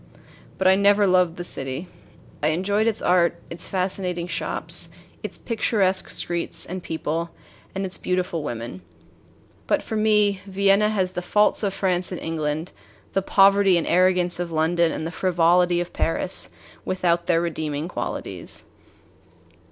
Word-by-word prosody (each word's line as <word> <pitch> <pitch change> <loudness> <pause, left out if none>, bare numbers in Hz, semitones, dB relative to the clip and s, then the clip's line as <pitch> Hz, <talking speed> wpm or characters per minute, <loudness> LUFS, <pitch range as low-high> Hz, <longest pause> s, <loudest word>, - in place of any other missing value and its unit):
But 190 - -2
I 190 - +7
never 200 +1 +4
loved 180 -3 +3
the 175 - -5
city. 135 +1 -3 0.5
I 150 - +2
enjoyed 200 +7 +1
its 225 -1 0
art, 175 -1 +3
its 170 +1 -6
fascinating 180 -2 -2
shops, - - -3 0.3
its - - -6
picturesque 205 -5 0
streets 170 -1 -1
and 185 +1 -5
people, 165 0 -3 0.5
and 195 0 -2
its 185 - -4
beautiful 180 -2 -1
women. 115 -8 -5 0.9
But - - +1
for 220 - -5
me 210 -2 +3
Vienna 200 +2 +3
has 190 -4 0
the 180 - -4
faults 210 +4 +2
of 200 -3 -1
France 180 -2 0
and 180 - -4
England, 160 +1 -3 0.4
the 195 - +2
poverty 195 -1 +5
and 170 - 0
arrogance 180 -1 +3
of 175 -1 -3
London, 165 +1 +2
and 155 - -4
the 165 - -3
frivolity 175 0 +3
of 175 0 -4
Paris, 165 +3 -1 0.3
without 175 -2 0
their 165 -2 +3
redeeming 155 -2 -3
qualities. 180 - -4
180 Hz, 145 wpm, -23 LUFS, 170-195 Hz, 0.9 s, I